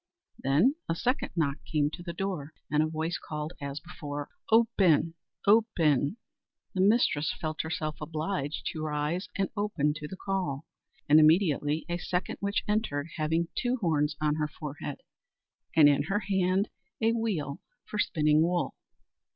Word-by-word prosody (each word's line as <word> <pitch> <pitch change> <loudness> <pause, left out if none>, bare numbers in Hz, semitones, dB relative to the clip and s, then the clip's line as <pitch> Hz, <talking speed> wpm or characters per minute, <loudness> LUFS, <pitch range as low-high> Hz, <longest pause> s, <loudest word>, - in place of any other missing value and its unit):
Then 150 - +3 0.2
a 165 - +1
second 250 +10 0
knock 145 -4 0
came 150 -1 0
to 175 - -8
the 175 -1 -5
door, 170 -5 -4 0.2
and 150 0 +4
a 155 - +2
voice 160 +2 -2
called 150 +2 -5
as 140 +1 -4
before, 145 -3 -6 0.2
"Open! 185 -8 +4 0.3
open!" 195 - +3 0.6
The 185 - 0
mistress 190 -7 +3
felt 155 -1 -2
herself 155 -1 -3
obliged 155 -1 -3
to 155 - -5
rise 155 +4 -1
and 195 -1 +1
open 175 -8 +1
to 150 -1 -6
the 190 - -8
call, 180 -8 -2 0.4
and 150 +1 +7
immediately 155 -2 +3
a 175 0 -2
second 180 0 -2
witch 200 0 0
entered, 190 -9 0
having 165 +2 0
two 245 0 +1
horns 155 - +1
on 150 -1 +2
her 150 -1 0
forehead, 145 -1 -7 0.7
and 155 -2 +8
in 145 -1 +4
her 200 +5 0
hand 190 0 +1 0.3
a 225 +1 +3
wheel 195 -12 -2 0.2
for 210 - -5
spinning 155 -4 +3
wool. 175 +1 +1
160 Hz, 150 wpm, -29 LUFS, 150-195 Hz, 0.7 s, and